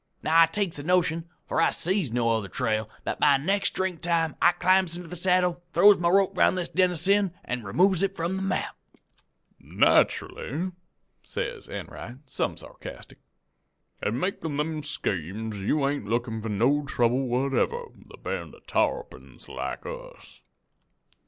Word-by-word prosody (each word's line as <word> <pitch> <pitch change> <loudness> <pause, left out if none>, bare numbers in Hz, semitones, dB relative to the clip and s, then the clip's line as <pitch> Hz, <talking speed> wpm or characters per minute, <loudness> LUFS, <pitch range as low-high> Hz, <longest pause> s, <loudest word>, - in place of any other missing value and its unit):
I - - -2
now 165 +1 +7
takes 190 -1 -1
the 145 - -6
notion 170 -1 +1 0.2
for - - +1
I - - +5
sees 180 - -1
no 115 -1 +1
other 110 -3 0
trail 110 0 -1
that - - -3
by 145 -2 +5
next 195 +8 0
drink 185 -3 -2
time 165 -3 +1
I 175 - +7
climbs 180 0 +2
into 175 -1 -8
the 180 - -7
saddle, 180 0 +2
throws 200 +3 +7
my 170 -1 +2
rope 195 +1 +3
'round 185 - +3
this 175 - -2
den 185 0 +3
of 175 - -3
sin, 195 +1 +2
an' 125 0 -3
removes 180 - +2
it 195 0 0
from 170 +2 -2
the 190 - -3
map.' 195 -1 -2 0.8
"'Nacherally,' 170 +8 +1 0.5
says - - -5
Enright, 120 - -7
some 130 - -2
sarcastic, - - -11 0.8
'in 115 +4 -1
makin' 160 -4 -2
them 155 +1 -1
schemes 105 - -3
you 135 +9 +1
ain't 140 -6 -2
lookin' 115 0 -1
for 110 - -4
no 125 +8 +2
trouble 125 -1 +1
whatever 135 - 0
with - - -20
a - - -12
band - - -5
of - - -21
tarrapins 480 0 -2
like - - -5
us.' - - -10
165 Hz, 165 wpm, -26 LUFS, 125-185 Hz, 0.8 s, now